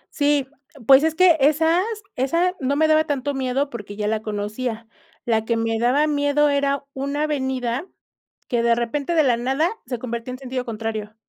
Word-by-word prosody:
Sí, 285 -2 +2 0.4
pues, 270 +2 +7
es 320 0 +1
que 345 -1 +5
esas 320 +5 +3 0.3
esa 335 +8 +1
no 275 +1 0
me 315 +2 +3
daba 310 0 +4
tanto 285 -2 -2
miedo, 270 +1 -1
porque 205 -3 -8
ya 210 0 -2
la 220 0 -1
conocía. 220 +2 -4 0.4
La 225 -2 +1
que 230 +1 -1
me 225 0 -1
daba 255 +6 +3
miedo 290 0 +2
era 280 0 0
una 280 +2 -2
avenida 265 0 -2 0.6
que 240 -1 0
de 235 0 +4
repente, 275 +7 -2
de 315 - +5
la 245 -3 +2
nada, 270 - 0 0.2
se 245 - -3
convertía 235 0 -5
en 255 - -6
sentido 255 -1 -4
contrario. 220 -2 -5
265 Hz, 180 wpm, -22 LUFS, 235-295 Hz, 0.6 s, pues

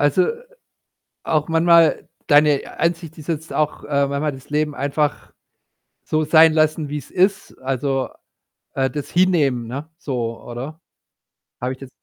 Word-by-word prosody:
Also, 145 +5 +3 1.0
auch 155 -1 0
manchmal 165 0 +4 0.2
deine 145 -1 +3
Ansicht 165 -1 -1
ist 155 - -11
jetzt 160 -1 -3
auch, 150 -1 -1
äh, 140 -1 +1
manchmal 140 +2 -1
das 135 0 -12
Leben 150 0 0
einfach 145 +1 -1 0.7
so 155 0 0
sein 160 +1 +6
lassen, 155 -1 +1
wie 150 - -3
es 145 - -9
ist. 190 +2 +1
Also, 135 0 -1 0.6
äh, 135 -1 +1
das 145 +2 -5
hinnehmen, 150 -10 +2
ne, 140 +6 -6
so 120 -7 -4
oder? 130 +7 -7 0.8
Habe 125 +1 -2
ich 130 - -13
das 135 - -10
150 Hz, 145 wpm, -21 LUFS, 135-160 Hz, 1.0 s, sein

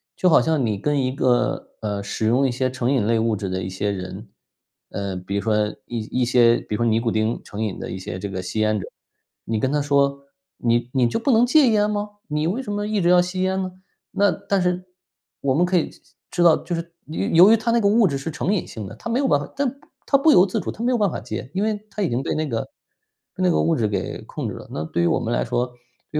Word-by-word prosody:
就 185 - +3
好 160 - +6
像 - - -1
就 160 - +1
好 160 - +3
像 130 - 0
你 105 -2 -1
跟 145 +7 0
一 130 - 0
个 125 -2 0
呃， 105 -2 -3
使 110 +2 -2
用 130 +4 +3
一 - - -1
些 130 +1 0
成 130 0 -1
瘾 130 -7 +2
类 115 - +3
物 110 -1 +1
质 100 -2 -4
的 95 0 -2
一 90 - -4
些 100 +2 -2
人 95 +2 -7 0.6
呃， 100 -1 -3
比 90 +2 -5
如 100 - 0
说 105 -1 +1 0.2
一 120 +2 -3
一 - - +3
些 120 -1 +5
比 105 - -5
如 - - -2
说 120 - 0
尼 115 0 +3
古 115 -1 0
丁 110 +2 0
成 105 +1 -7
瘾 105 -4 -2
的 - - -6
一 95 - -5
些 90 -1 -6
这 100 - -4
个 95 -1 -4
吸 100 +4 -3
烟 110 0 +2
者。 95 - -6 0.6
你 110 -1 -1
跟 130 +3 0
他 145 - +2
说： 140 -1 +1 0.3
“你 120 0 +1
你 130 -3 +3
就 225 - -1
不 265 +4 +1
能 235 +1 +5
戒 285 +2 +5
烟 210 -1 +3
吗？ 205 0 -3 0.2
你 150 +1 0
为 225 +9 -1
什 205 - -5
么 205 0 -2
一 215 -2 0
直 175 - +3
要 180 0 +6
吸 180 +1 -3
烟 190 0 0
呢？” 185 -1 -4 0.4
那 200 -2 +3
但 200 -2 -1
是 180 0 0 0.6
我 135 -1 +1
们 175 +4 +3
可 180 0 +2
以 165 - 0 0.4
知 175 - -1
道， 165 -2 +7
就 175 - -6
是 170 0 -6
由 155 - -2 0.2
由 - - +7
于 225 - +6
它 230 +2 -1
那 235 - +3
个 200 - +3
物 215 -1 +5
质 140 - -1
是 150 +4 -5
成 190 - -1
瘾 195 - -1
性 105 -4 -7
的。 110 - -9
他 175 - -7
没 240 +3 +1
有 280 - +2
办 145 - +4
法 145 - -6
他 280 - +1 0.4
他 275 - +5
不 305 +3 +4
由 185 -7 +7
自 185 - -2
主， - - -4
他 225 - -9
没 250 - +2
有 245 - +2
办 205 -5 +2
法 - - -4
戒。 125 +3 -6
因 190 - -1
为 215 -1 -2
他 210 - -4
已 175 - +1
经 125 +3 -1
对 - - -1
那 155 -1 -1
个 115 -3 -1 0.7
被 185 - -2
那 180 - +4
个 - - +2
物 165 - +2
质 115 -6 +1
给 95 -4 -3
控 - - -5
制 - - -6
了。 - - -10
那 75 +1 -3
对 85 +1 -1
于 85 - +3
我 - - +2
们 - - -2
来 - - +1
说 120 - 0 0.5
对 150 - 0
140 Hz, 310 characters per minute, -22 LUFS, -, 0.7 s, 道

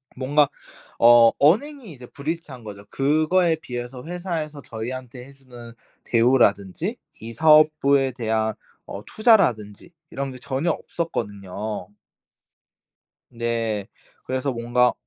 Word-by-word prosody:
뭔가 145 +3 +2 0.5
어 115 -1 +7
언행이 225 - +2
이제 125 -4 -12
불일치한 145 -3 -6
거죠. 100 -1 -10
그거에 155 +5 +2
비해서 125 -3 -7
회사에서 165 -4 -5
저희한테 125 +2 -7
해 140 - -15
주는 120 -3 -13 0.3
대우라든지 120 - +2 0.2
이 115 +1 -7
사업부에 150 -2 +4
대한 110 -2 -1 0.3
어 100 - -8
투자라든지 170 - +2 0.2
이런 135 -1 -4
게 130 - -10
전혀 135 +6 -2
없었거든요. 105 - -5 1.4
네. 115 -3 -2 0.4
그래서 130 +1 -2
뭔가 120 +1 +1
130 Hz, 260 characters per minute, -23 LUFS, 115-155 Hz, 1.4 s, 어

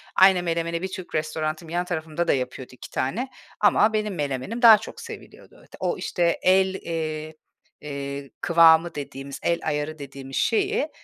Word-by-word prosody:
Aynı 190 -1 +6
menemeni 170 0 -1
bir 190 - -2
Türk 185 -1 -7
restoranım 155 +1 -2
yan 175 +2 -1
tarafımda 165 -1 -3
da - - +4
yapıyordu 130 -1 -4
2 125 - -11
tane 225 - -2 0.3
ama 210 +1 +4
benim 215 -2 -1
menemenim 145 - -3
daha 225 -3 +10
çok 210 - -9
seviliyordu. - - -12
O, - - -1
işte, 170 -2 0
el, 190 +1 +4
eee, 155 -3 -4 0.5
eee, 140 -1 -6
kıvamı 165 0 +5
dediğimiz, 140 -1 -7
el 170 0 +1
ayarı 150 +1 -2
dediğimiz 135 -1 -8
şeyi 430 +2 +1
165 Hz, 150 wpm, -24 LUFS, 145-185 Hz, 0.5 s, daha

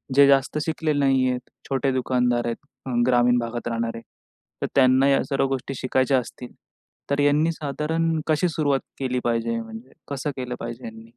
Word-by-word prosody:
जे 140 0 +7
जास्त 140 +2 +3
शिकलेले 155 -2 -1
नाही 135 -2 +3
आहेत, 125 0 -4 0.2
छोटे 135 0 +1
दुकानदार 125 -2 +1
आहेत, 115 -1 -2 0.5
ग्रामीण 120 0 +4
भागात 120 0 -4
राहणारे. 115 0 -2 0.6
तर - - 0
त्यांना 130 0 +5
या 135 - +3
सर्व 135 -1 +1
गोष्टी 135 0 -3
शिकायच्या 130 +1 +1
असतील. 125 0 -8 0.6
तर 140 0 0
यांनी 145 +3 +3
साधारण 160 +2 -1
कशी 155 +3 +2
सुरुवात 145 -4 +1 0.2
केली 125 -1 -1
पाहिजे? 115 -1 0
म्हणजे 115 +3 -10 0.2
कसं 140 +1 -3
केलं 125 -1 -4
पाहिजे 120 +1 -6
यांनी? 110 0 -9
130 Hz, 160 wpm, -24 LUFS, 120-140 Hz, 0.6 s, जे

